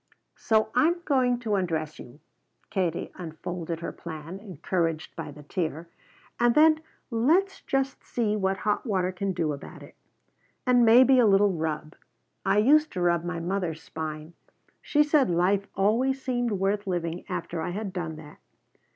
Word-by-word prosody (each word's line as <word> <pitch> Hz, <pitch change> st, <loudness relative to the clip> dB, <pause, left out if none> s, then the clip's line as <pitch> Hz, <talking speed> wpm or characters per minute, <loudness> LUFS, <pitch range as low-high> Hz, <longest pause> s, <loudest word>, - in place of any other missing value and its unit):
"So 220 Hz, -1 st, +2 dB
I'm 340 Hz, +3 st, +3 dB
going 255 Hz, -4 st, +2 dB
to 220 Hz, -3 st, -2 dB
undress 160 Hz, -5 st, -1 dB
you," 125 Hz, +5 st, -12 dB, 0.5 s
Katie 180 Hz, -4 st, -1 dB
unfolded 170 Hz, 0 st, -6 dB
her 170 Hz, -, -4 dB
plan, 165 Hz, +2 st, -8 dB
encouraged 170 Hz, -4 st, -3 dB
by -, -, -6 dB
the 150 Hz, +1 st, -11 dB
tear, 165 Hz, 0 st, -3 dB, 0.5 s
"and 240 Hz, 0 st, +3 dB
then 310 Hz, 0 st, +6 dB, 0.3 s
let's 325 Hz, +13 st, +2 dB
just 270 Hz, -1 st, -2 dB
see 220 Hz, -3 st, -1 dB
what 195 Hz, -2 st, 0 dB
hot 210 Hz, 0 st, 0 dB
water 185 Hz, -6 st, 0 dB
can 195 Hz, +1 st, -2 dB
do 165 Hz, -5 st, -1 dB
about 140 Hz, -, -10 dB
it. -, -, -14 dB, 0.7 s
And 250 Hz, -2 st, +5 dB
maybe 255 Hz, +3 st, +7 dB
a 235 Hz, -, +5 dB
little 200 Hz, 0 st, +5 dB
rub. 155 Hz, -2 st, -3 dB, 0.5 s
I 195 Hz, +1 st, +2 dB
used 300 Hz, +8 st, +5 dB
to 180 Hz, -, -3 dB
rub 170 Hz, -1 st, +2 dB
my 175 Hz, -1 st, -3 dB
mother's 175 Hz, -2 st, -3 dB
spine. 155 Hz, 0 st, -6 dB, 0.5 s
She 295 Hz, -1 st, +3 dB
said 295 Hz, -, +3 dB
life 185 Hz, +3 st, +2 dB
always 235 Hz, +7 st, +2 dB
seemed 245 Hz, -3 st, -1 dB
worth 200 Hz, +1 st, -1 dB
living 175 Hz, -2 st, -2 dB
after 175 Hz, -2 st, -4 dB
I 160 Hz, -, -2 dB
had 195 Hz, +1 st, -4 dB
done 165 Hz, -4 st, -4 dB
that." 155 Hz, -1 st, -12 dB
190 Hz, 160 wpm, -27 LUFS, 165-235 Hz, 0.7 s, maybe